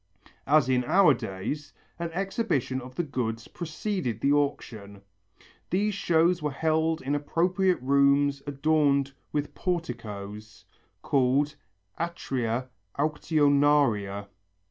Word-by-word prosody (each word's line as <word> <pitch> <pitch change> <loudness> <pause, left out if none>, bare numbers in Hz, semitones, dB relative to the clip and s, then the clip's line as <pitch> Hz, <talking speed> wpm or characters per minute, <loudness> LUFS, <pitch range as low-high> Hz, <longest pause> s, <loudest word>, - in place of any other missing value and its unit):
As 150 -1 +4
in 125 -1 +2
our 180 0 +5
days, 115 +7 -5 0.3
an 170 0 -2
exhibition 190 - -1
of 125 +1 -11
the 175 - 0
goods 115 -6 -3
preceded 170 - -3
the 140 - +2
auction. 110 -8 -2 0.7
These 205 +3 +1
shows 170 -2 +2
were 150 - 0
held 160 +2 0
in 135 +2 -1
appropriate 180 +5 +1
rooms 140 +1 +3
adorned 140 -1 +2 0.2
with 145 -1 -2
porticos, 105 - -5 0.4
called 140 +2 +2 0.5
atria 130 -7 -2 0.3
auctionaria. 145 -9 +2
145 Hz, 100 wpm, -27 LUFS, 125-160 Hz, 0.7 s, our